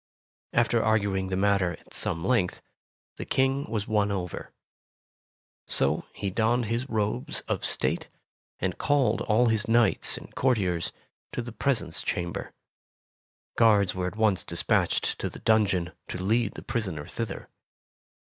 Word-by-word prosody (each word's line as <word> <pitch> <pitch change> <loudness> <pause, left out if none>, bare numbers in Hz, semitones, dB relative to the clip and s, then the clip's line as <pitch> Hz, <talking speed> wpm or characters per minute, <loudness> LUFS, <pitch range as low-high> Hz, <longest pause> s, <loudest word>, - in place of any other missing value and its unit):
'' - - -
After 120 0 +3
arguing 100 -3 +1
the 95 0 -2
matter 100 -3 +2
at - - -15
some 85 +2 -1
length, 115 -8 +1 0.6
the - - -4
King 135 +2 +1
was 110 -2 -2
won 105 -2 +2
over. 90 -4 -4 1.2
So 70 - +3
he 100 - -4
donned 115 +4 +2
his 115 +5 -2
robes 105 - -1
of - - -3
state, - - 0 0.5
and 95 -1 -2
called 145 -3 +2
all 115 +2 +3
his 110 -1 +1
knights 115 0 +3
and - - -11
courtiers 95 -10 +1 0.4
to 120 - -2
the 120 - -7
presence 110 -6 -1
chamber. 85 -1 -3 1.0
Guards 105 -4 +4
were 90 -1 -2
at 90 - -5
once 110 -4 +2
despatched 85 0 +1
to - - -2
the - - -10
dungeon 100 -6 +2 0.2
to - - -5
lead 105 +3 +1
the - - -8
prisoner 95 -11 -3
thither. 115 -1 -5
105 Hz, 145 wpm, -27 LUFS, 95-115 Hz, 1.2 s, Guards